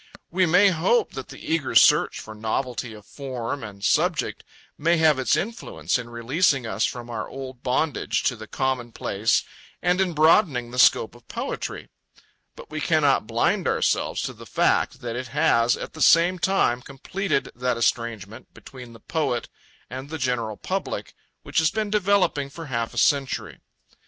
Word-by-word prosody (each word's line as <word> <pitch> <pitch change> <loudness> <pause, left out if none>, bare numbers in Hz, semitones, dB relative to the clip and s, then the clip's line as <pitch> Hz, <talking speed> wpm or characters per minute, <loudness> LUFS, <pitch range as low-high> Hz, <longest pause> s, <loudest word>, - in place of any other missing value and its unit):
We 185 +1 +2
may 180 +5 +6
hope 190 - +1
that - - -7
the - - -10
eager 160 -4 -2
search - - +5
for 110 - -9
novelty 115 +3 -3
of 105 -1 -14
form 130 -1 -5
and 100 -2 -9
subject - - +1 0.3
may 170 +3 +2
have 155 -4 +4
its 130 - +2
influence 225 - -2
in 120 -1 -8
releasing 130 +3 +1
us 110 0 0
from 120 -1 -5
our 110 -2 -4
old 130 -2 -8
bondage 130 +3 0
to 125 - +1
the 110 -1 -10
commonplace 120 -5 -1 0.4
and 180 +1 +1
in 185 -3 0
broadening 155 - +3
the 125 - -4
scope 115 -1 +5
of 120 -1 -19
poetry; - - -5 0.7
but - - -13
we 155 0 -4
cannot 145 -9 +2
blind 115 +1 +1
ourselves - - 0
to - - -4
the - - -13
fact - - +1
that 120 -1 -4
it 125 +1 -4
has 115 0 +2
at - - -7
the 160 - -9
same 175 +2 +5
time 160 -9 +2
completed 140 +6 -3
that 125 -1 -1
estrangement 110 -3 -2
between 125 -3 -12
the 115 - -14
poet 150 -6 -2 0.4
and 130 +3 -7
the 160 - -4
general 120 -6 -2
public - - -4 0.3
which - - 0
has 160 -1 +3
been 215 +2 -2
developing 200 -8 +2
for 165 +4 -9
half 115 -5 -3
a - - -8
century. 140 -2 +1
130 Hz, 165 wpm, -24 LUFS, 120-160 Hz, 0.7 s, may